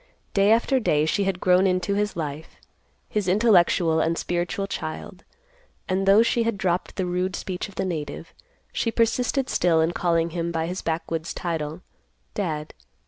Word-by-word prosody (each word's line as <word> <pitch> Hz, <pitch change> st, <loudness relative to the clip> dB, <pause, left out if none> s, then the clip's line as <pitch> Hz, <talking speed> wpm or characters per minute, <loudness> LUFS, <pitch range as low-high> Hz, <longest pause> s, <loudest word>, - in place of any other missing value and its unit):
Day 200 Hz, +1 st, +4 dB
after 240 Hz, +4 st, +3 dB
day 150 Hz, -10 st, +2 dB
she 195 Hz, +5 st, +1 dB
had 190 Hz, -2 st, -1 dB
grown 185 Hz, +1 st, +4 dB
into 185 Hz, +1 st, 0 dB
his 205 Hz, +1 st, -1 dB
life—his 160 Hz, +5 st, -6 dB
intellectual 180 Hz, -5 st, +4 dB
and 165 Hz, +1 st, +1 dB
spiritual 175 Hz, +3 st, -2 dB
child, 180 Hz, 0 st, -6 dB, 0.6 s
and 190 Hz, +1 st, 0 dB
though 200 Hz, +3 st, +7 dB
she 235 Hz, 0 st, +1 dB
had 230 Hz, -2 st, 0 dB
dropped 180 Hz, -2 st, -1 dB
the 190 Hz, -, -1 dB
rude 180 Hz, +1 st, -1 dB
speech 185 Hz, +2 st, -4 dB
of 200 Hz, -, -16 dB
the -, -, -1 dB
native, 160 Hz, -2 st, -5 dB, 0.4 s
she 230 Hz, -, 0 dB
persisted 245 Hz, +3 st, +1 dB
still 170 Hz, -7 st, +2 dB
in 160 Hz, +1 st, +2 dB
calling 170 Hz, -1 st, +1 dB
him 170 Hz, 0 st, -2 dB
by 165 Hz, -1 st, -1 dB
his 180 Hz, +3 st, -4 dB
backwoods 165 Hz, 0 st, -3 dB
title, 160 Hz, -1 st, -3 dB, 0.5 s
"Dad." 155 Hz, -6 st, -3 dB
180 Hz, 160 wpm, -24 LUFS, 165-200 Hz, 0.6 s, though